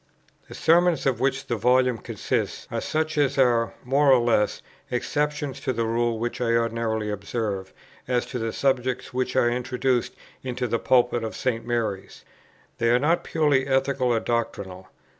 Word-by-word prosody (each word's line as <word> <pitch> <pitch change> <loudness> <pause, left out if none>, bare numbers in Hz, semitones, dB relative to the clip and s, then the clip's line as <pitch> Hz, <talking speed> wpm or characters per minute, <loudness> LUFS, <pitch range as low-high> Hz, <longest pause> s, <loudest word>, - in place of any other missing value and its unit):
The - - -10
Sermons 170 -1 +3
of 130 -4 +1
which 135 +1 0
the 120 - -2
Volume 125 +1 +3
consists - - -3
are - - -2
such 155 -1 -1
as 140 -1 +1
are, 120 -3 +2
more 140 +2 +3
or 130 - +7
less, 120 -3 +1 0.3
exceptions 145 +2 -2
to 135 -2 -2
the 115 -1 -1
rule 115 0 0
which 120 +2 -3
I 115 -1 +1
ordinarily 115 -2 -1
observed, 100 -1 -3 0.4
as 125 -1 0
to 125 - -3
the 115 0 -2
subjects 130 -1 -1
which 130 0 -2
I 120 - +4
introduced 125 0 -1 0.3
into 125 -1 -3
the 115 0 0
pulpit 120 -2 +2
of 110 - -4
St. 115 -3 -2
Mary's. 110 -5 -3 0.5
They 115 - +2
are 120 - +5
not 155 +7 +1
purely 145 -4 +1
ethical 135 -1 +1
or 120 -2 +2
doctrinal. 100 -6 -3
125 Hz, 165 wpm, -25 LUFS, 115-135 Hz, 0.5 s, or